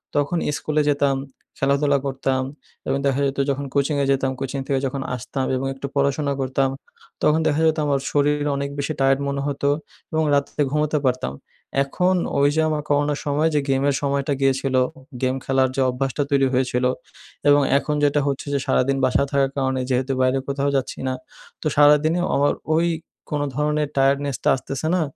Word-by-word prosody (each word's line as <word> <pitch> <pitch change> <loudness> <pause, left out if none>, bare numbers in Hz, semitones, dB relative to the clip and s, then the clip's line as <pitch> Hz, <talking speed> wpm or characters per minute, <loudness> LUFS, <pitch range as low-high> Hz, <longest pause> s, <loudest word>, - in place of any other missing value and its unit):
তখন 145 +4 +1 0.2
স্কুলে 150 0 0
যেতাম, 140 -1 +2 0.4
খেলাধুলা 140 +1 +2
করতাম 135 -1 -1 0.5
এবং 135 - +1
দেখা 135 0 +1
যেতো 135 0 -1
যখন 140 +1 -1
কোচিংয়ে 140 0 +1
যেতাম 135 -1 +1
কোচিং 135 +1 -3
থেকে 135 -2 +1
যখন 135 +1 -4
আসতাম 130 +2 -3
এবং 130 +1 -2
একটু 135 +1 -7
পড়াশোনা 140 +1 +1
করতাম। 135 +1 +1 0.5
তখন 150 +1 +4
দেখা 150 +1 +1
যেতো 155 0 +1
আমার 140 -1 +2
শরীর 145 0 +1
অনেক 140 0 -2
বেশি 140 +2 -1
টায়ার্ড 135 0 +3
মনে 140 0 -2
হতো 140 0 0 0.4
এবং 160 0 +1
রাত্রে 140 +1 -1
ঘুমোতে 150 +1 +1
পারতাম। 125 - -1 0.5
এখন 180 +7 +1 0.2
ওইযে 145 +3 +3
আমার 150 -1 -1
করোনার 145 0 +1
সময় 150 +2 +2
যে - - +4
গেমের 135 +1 +2
সময়টা 140 0 0
গিয়েছিলো, 135 -1 +2 0.2
উ - - -13 0.2
গেম 130 0 +1
খেলার 130 -1 +2
যে 135 - +1
অভ্যাসটা 135 +3 -1
তৈরি 135 -1 +4
হয়েছিলো 125 0 +1 0.6
এবং 145 0 +6 0.2
এখন 150 +1 -1
যেটা 145 0 +3
হচ্ছে 140 +1 -2
যে, 140 - +1
সারাদিন 135 +2 +2
বাসায় 135 +2 +2
থাকার 135 -1 +2
কারণে 130 -1 0
যেহেতু 130 +1 0
বাইরে 130 +1 +2
কোথাও 140 0 0
যাচ্ছি 135 -1 -2
না। 130 - 0 0.5
তো - - -1
সারাদিনে 150 +3 +5 0.2
আমার 145 +1 +3 0.2
ওই 170 +2 +3 0.4
কোনো 145 -1 0
ধরনের 150 0 0
টায়ার্ডনেস 140 0 +2
টা - - +3
আসতেছে 135 +4 -4
না। 180 - +1
140 Hz, 175 wpm, -22 LUFS, 135-145 Hz, 0.6 s, এবং